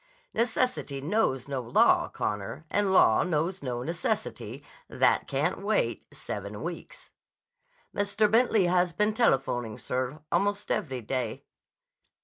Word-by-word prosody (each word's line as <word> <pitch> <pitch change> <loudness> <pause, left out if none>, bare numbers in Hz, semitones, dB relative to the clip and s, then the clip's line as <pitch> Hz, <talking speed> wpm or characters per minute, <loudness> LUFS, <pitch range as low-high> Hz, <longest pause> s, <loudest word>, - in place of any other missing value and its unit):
Necessity 235 - 0
knows 140 - 0
no 135 -2 -2
law, 120 0 +3
Connor, 105 +9 -4
and 205 -2 +2
law 190 - +5
knows 175 +2 -1
no 125 -2 -3
necessity 170 - -3 0.3
that - - +2
can't - - -1
wait - - 0
seven - - -6
weeks." - - -8 0.8
"Mr. 205 +1 +1
Bentley 225 -4 +4
has 175 0 +2
been 210 +4 +1
telephoning, 130 - +1
sir, 130 +3 -3
almost 205 +1 0
every 130 -5 -1
day." 120 -1 -3
170 Hz, 120 wpm, -28 LUFS, 130-205 Hz, 0.8 s, law